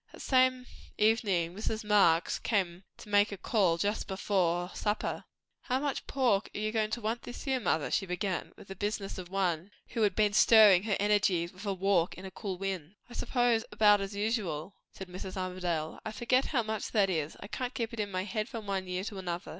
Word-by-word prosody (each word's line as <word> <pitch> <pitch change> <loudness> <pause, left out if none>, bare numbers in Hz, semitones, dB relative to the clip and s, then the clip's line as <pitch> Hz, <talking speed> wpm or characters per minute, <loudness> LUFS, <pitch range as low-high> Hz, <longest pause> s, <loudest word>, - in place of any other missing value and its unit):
That - - -12
same 255 -1 +3 0.3
evening 205 -6 +2
Mrs. 220 +2 -3
Marx 200 -6 +3
came 190 -4 -1
to - - -12
make 205 0 +3
a 200 - -5
call, 185 -4 +2
just 205 +5 -1
before 180 -3 0
supper. 210 0 -2 0.4
"How 255 0 0
much 285 -1 -3
pork 240 -7 +1
are - - -3
you 215 0 -1
goin' 215 -1 0
to 235 +2 -3
want 225 +2 -2
this 245 - -8
year, 265 -2 +1
mother?" 160 -9 0
she 195 - 0
began, 180 +1 -2
with - - -13
the 195 - -7
business 205 -1 -3
of 180 -1 -8
one 185 -2 -1 0.2
who 230 - -3
had 205 -3 +2
been 210 -1 +2
stirring 210 -4 +7
her 210 -3 +1
energies 200 -4 +2
with 195 +3 -9
a 200 - +1
walk 185 -2 +1
in 185 - -10
a 190 - -7
cool 190 -1 -5
wind. 190 -2 -4 0.2
"I - - -9
suppose, 240 -2 +1
about 210 -1 +5
as 195 +1 -5
usual," 200 -6 -2 0.2
said 190 - -9
Mrs. 185 +1 -7
Armadale. 180 -4 -3
"I 220 - -4
forget 255 +4 +1
how 250 -6 0
much 220 -1 -3
that 200 -4 +3
is; 155 -3 -2
I - - -8
can't 250 +4 -4
keep 230 0 -3
it 230 - -6
in 205 -1 -1
my 185 -1 -2
head 215 +2 -3
from 230 -4 -6
one 195 -2 -2
year 180 +1 -2
to 205 -2 -6
another. 175 -2 -4
200 Hz, 215 wpm, -30 LUFS, 185-220 Hz, 0.4 s, stirring